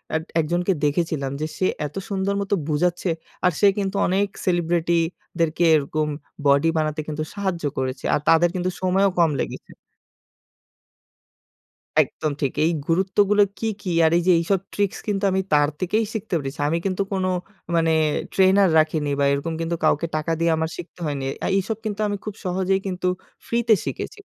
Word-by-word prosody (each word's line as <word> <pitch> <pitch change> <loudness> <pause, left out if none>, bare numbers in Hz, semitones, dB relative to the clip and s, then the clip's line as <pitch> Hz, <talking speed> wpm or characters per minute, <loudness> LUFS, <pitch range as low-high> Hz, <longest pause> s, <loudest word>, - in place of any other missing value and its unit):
এত 160 - 0 0.2
একজনকে 175 +4 +1
দেখেছিলাম 145 -3 0
যে - - 0
সে 185 - +1 0.2
এত 150 - -7
সুন্দর 195 0 0
মতো 200 0 -2 0.2
বোঝাচ্ছে 175 +4 0 0.4
আর 180 - +5
সে 205 - +6
কিন্তু 200 -1 -1
অনেক 195 +3 +2 0.2
সেলিব্রিটিদেরকে 170 -1 0
এরকম 155 +1 0 0.4
বডি 140 +3 +4
বানাতে 155 0 -1
কিন্তু 155 0 -3
সাহায্য 190 -5 -3
করেছে। 130 0 -3
আর - - +3
তাদের 170 +1 +5
কিন্তু 185 0 0
সময়ও 190 +1 +3
কম 165 -3 +4
লেগেছে। - - -5 2.3
একদম 155 - -4
ঠিক। 140 -3 0
এই 165 - +3 0.2
গুরুত্বগুলো 195 +4 +3 0.2
কী, 225 - -1
কী? 185 - -3
আর 160 - +4
এই - - +2
যে 185 - +7
এইসব 185 +3 +1
ট্রিকস 200 -2 -1
কিন্তু 205 -1 -1
আমি 190 - +1
তার 145 0 +4
থেকেই 215 +5 +1
শিখতে 220 -2 -5
পেরেছি। 135 -1 -6
আমি 165 - +1
কিন্তু 190 0 0
কোনো 185 -1 0 0.5
মানে 165 -1 +3 0.4
ট্রেনার 190 0 +5
রাখিনি 155 -1 +1
বা 140 - +3
এরকম 140 +4 -1
কিন্তু 165 +1 -1
কাউকে 165 +3 +2
টাকা 155 +2 -1
দিয়ে 165 0 +2
আমার 160 0 -1
শিখতে 175 0 -10
হয়নি। 140 -2 -2 0.2
আ - - +1
এসব 215 +3 -3
কিন্তু 210 -1 -3
আমি 205 0 -2
খুব 210 - -4
সহজেই 190 +1 +1
কিন্তু 185 -1 -2 0.4
ফ্রিতে 235 -1 +3
শিখেছি। 430 - -5
175 Hz, 165 wpm, -23 LUFS, 155-195 Hz, 2.3 s, যে